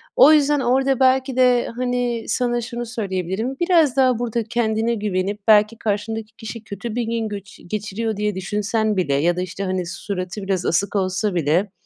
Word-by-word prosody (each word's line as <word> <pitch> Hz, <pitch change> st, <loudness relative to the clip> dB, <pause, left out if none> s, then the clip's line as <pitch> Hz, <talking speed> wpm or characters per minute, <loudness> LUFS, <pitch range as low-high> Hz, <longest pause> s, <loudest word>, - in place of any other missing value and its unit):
O 280 Hz, -, +8 dB
yüzden 295 Hz, -1 st, +3 dB
orada, 265 Hz, +1 st, +2 dB
belki 260 Hz, 0 st, +2 dB
de, 250 Hz, -1 st, +4 dB
hani, 245 Hz, -2 st, -1 dB
sana 240 Hz, -1 st, 0 dB
şunu 240 Hz, +1 st, -5 dB
söyleyebilirim. 205 Hz, +1 st, -3 dB
Biraz 335 Hz, -6 st, +3 dB
daha 255 Hz, -3 st, +3 dB
burada 235 Hz, -1 st, -1 dB
kendine 225 Hz, 0 st, 0 dB
güvenip, 205 Hz, -1 st, -2 dB
belki, 215 Hz, +1 st, +5 dB
karşındaki 220 Hz, +1 st, -3 dB
kişi 225 Hz, 0 st, -8 dB
kötü 215 Hz, +2 st, -6 dB
bir 245 Hz, -, 0 dB
gün 230 Hz, -1 st, -2 dB
göçü 200 Hz, -1 st, -9 dB
geçiriyor 215 Hz, +3 st, -3 dB
diye 210 Hz, -1 st, -1 dB
düşünsen 210 Hz, +2 st, -1 dB
bile 160 Hz, -6 st, +1 dB
ya 165 Hz, +5 st, +2 dB
da, -, -, 0 dB
işte, 185 Hz, +2 st, -5 dB
hani, 185 Hz, -2 st, -2 dB
suratı 185 Hz, +1 st, -5 dB
biraz 190 Hz, -2 st, -1 dB
asık 195 Hz, +5 st, 0 dB
olsa 190 Hz, +1 st, 0 dB
bile, 170 Hz, +5 st, +1 dB
220 Hz, 170 wpm, -21 LUFS, 195-240 Hz, -, O